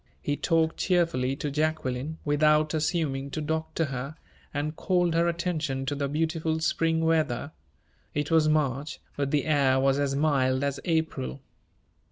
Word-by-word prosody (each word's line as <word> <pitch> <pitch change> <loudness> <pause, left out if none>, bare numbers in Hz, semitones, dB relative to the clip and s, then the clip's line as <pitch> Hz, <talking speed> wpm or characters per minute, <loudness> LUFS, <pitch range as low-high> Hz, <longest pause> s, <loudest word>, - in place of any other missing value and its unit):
He 145 - -1
talked 160 0 +1
cheerfully 165 -8 +1
to 145 +1 -3
Jacqueline, 150 -1 -1
without 150 +1 +3
assuming 150 -4 -1
to 155 - -4
doctor 160 +1 -1
her, 135 +1 -5 0.4
and 150 +2 -3
called 180 -1 +1
her 170 +1 +3
attention 160 -6 -1
to 135 - -1
the 140 -1 -1
beautiful 160 +2 -1
spring 160 0 +1
weather. 155 -4 +1 0.6
It 145 +1 -1
was 160 -1 +4
March, 150 -1 0 0.2
but 140 -1 -1
the 145 -1 +1
air 140 -4 +3
was 135 +1 +2
as 140 -1 0
mild 135 -3 +2
as 140 -1 -1
April. 160 - -1
150 Hz, 150 wpm, -27 LUFS, 140-160 Hz, 0.6 s, was